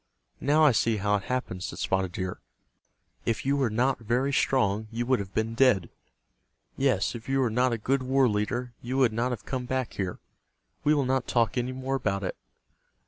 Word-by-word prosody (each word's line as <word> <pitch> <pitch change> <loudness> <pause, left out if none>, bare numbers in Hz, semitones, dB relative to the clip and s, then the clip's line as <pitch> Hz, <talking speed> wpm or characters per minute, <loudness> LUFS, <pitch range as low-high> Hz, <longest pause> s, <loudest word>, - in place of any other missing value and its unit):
"Now 150 +3 +3
I 145 - +7
see 115 -1 +2
how 105 +1 +2
it 100 - -8
happened," 125 -8 -3
said - - -5
Spotted 95 -2 0
Deer. 95 0 -4 0.8
"If 115 +1 -1
you 140 +1 +2
were 135 -4 +1
not 125 +5 +1
very 125 +5 0
strong 110 -6 +1
you 120 +2 -3
would 130 0 +2
have 100 -1 -7
been 110 +1 0
dead. 115 -8 +3 0.8
Yes, 130 -8 +1
if 115 +1 -8
you 135 0 +2
were 125 -4 +2
not 125 +3 +2
a 115 - 0
good 130 +5 0
war 130 0 +3
leader 120 +3 -1
you 125 +2 -3
would 125 -5 +3
not 120 +3 0
have 120 -5 -5
come 130 -2 -3
back 130 -2 -2
here. 95 -3 -3 0.7
We 150 +1 +4
will 140 -2 +1
not 130 -1 0
talk 115 -2 +1
any 125 0 -1
more 130 +1 -4
about 100 -7 -1
it." 90 - -3
120 Hz, 200 wpm, -27 LUFS, 105-130 Hz, 0.8 s, I